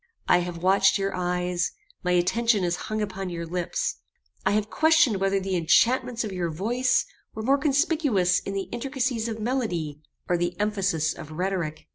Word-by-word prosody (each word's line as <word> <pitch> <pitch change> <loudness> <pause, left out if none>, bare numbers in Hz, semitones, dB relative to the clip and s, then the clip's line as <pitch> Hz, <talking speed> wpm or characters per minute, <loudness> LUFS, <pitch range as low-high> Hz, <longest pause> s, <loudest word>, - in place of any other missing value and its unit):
I 175 - +5
have 175 -1 -5
watched 195 +1 +4
your 195 0 -2
eyes; 180 0 -1 0.3
my 180 0 +1
attention 200 +4 +2
has 175 0 +1
hung 215 0 -1
upon 195 -2 -4
your 170 -1 -4
lips. 175 +1 -2 0.5
I - - +2
have 215 0 0
questioned 315 -9 +4
whether 195 0 +1
the 190 0 -2
enchantments 235 +8 +3
of 215 - -4
your 180 -2 -2
voice 235 +10 +1 0.3
were 220 - -4
more 275 +4 +3
conspicuous 275 - +2
in 195 - -6
the 195 - -2
intricacies 245 -2 -2
of 225 -1 -4
melody, 180 - -2 0.3
or 175 - +2
the 175 +1 -2
emphasis 195 -7 0
of 155 - -10
rhetoric. 170 -3 -3
195 Hz, 170 wpm, -26 LUFS, 175-230 Hz, 0.5 s, I